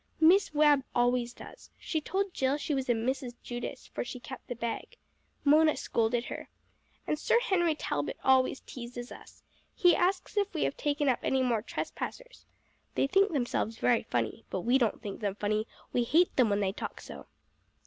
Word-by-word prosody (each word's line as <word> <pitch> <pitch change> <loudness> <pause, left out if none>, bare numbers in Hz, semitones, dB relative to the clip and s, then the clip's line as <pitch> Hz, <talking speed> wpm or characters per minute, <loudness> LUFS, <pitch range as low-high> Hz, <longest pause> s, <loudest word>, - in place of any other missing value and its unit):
Miss 350 +5 +5
Webb 295 -2 +5
always 245 0 +2
does. - - -13
She 315 - -2
told 385 +4 -2
Jill 265 +2 +1
she 300 - -2
was 265 -2 -2
a - - +5
Mrs. 245 +2 -2
Judas, 240 0 -6
for - - -4
she 250 +1 -7
kept 260 +2 -9
the 245 - -4
bag. 235 - -5 0.5
Mona 310 +2 +5
scolded 235 +1 0
her. - - -7 0.6
And 300 - -1
Sir 465 - +3
Henry 345 -8 +2
Talbot - - -3
always 260 0 +3
teases 245 0 -8
us. - - -13 0.3
He 355 -2 +5
asks 370 +3 0
if 410 0 +2
we 315 - +1
have - - 0
taken 290 0 0
up 255 - +3
any 265 -1 +1
more 235 -4 +1
trespassers. - - -6 0.5
They - - +3
think 390 +7 +3
themselves 240 -5 -1
very 240 -2 +3
funny, 115 -3 -2
but 185 - -2
we 245 +7 +3
don't 230 -4 0
think 200 -2 -5
them 200 -2 -2
funny, 215 +2 -1 0.3
we 245 - +2
hate 330 +9 +3
them 245 -4 +4
when 205 0 +1
they 190 -1 +1
talk 200 - -6
so." - - -10
260 Hz, 185 wpm, -30 LUFS, 235-315 Hz, 0.6 s, Miss